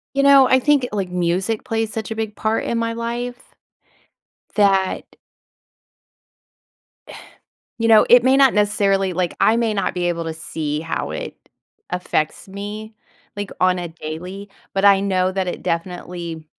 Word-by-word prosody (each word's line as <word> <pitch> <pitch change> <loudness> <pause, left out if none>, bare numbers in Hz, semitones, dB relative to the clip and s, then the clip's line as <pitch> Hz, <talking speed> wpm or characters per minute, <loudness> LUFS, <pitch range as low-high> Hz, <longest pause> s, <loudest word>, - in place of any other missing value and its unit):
You 275 - +2
know, 275 -2 +7
I 260 - +5
think, 275 -1 +2
like, 195 -3 -2
music 180 +5 -1
plays 225 -1 -2
such 220 -1 -5
a 220 - -4
big 220 -1 -3
part 220 +1 -1
in 235 - -1
my 230 0 -1
life, 240 +1 -5 1.0
that 195 -2 +2 2.7
you 230 0 +1
know, 220 -1 +6
it 245 0 +7
may 260 +1 +5
not 270 -2 +5
necessarily 200 -2 +2
like, 180 -1 -1
I 225 - +4
may 230 -2 0
not 200 - -1
be 175 -1 -1
able 170 -1 -2
to 160 -1 -4
see 155 -1 -4
how 165 +1 -3
it - - -6 0.5
affects 180 -1 -2
me, 205 +3 -7 0.4
like, 205 -1 -4
on 185 0 +3
a 175 -1 -4
daily, 175 +5 -8 0.2
but 195 0 0
I 200 -1 +6
know 185 -2 +1
that 190 -1 -2
it - - -5
definitely 170 -1 -4
200 Hz, 155 wpm, -20 LUFS, 180-225 Hz, 2.7 s, know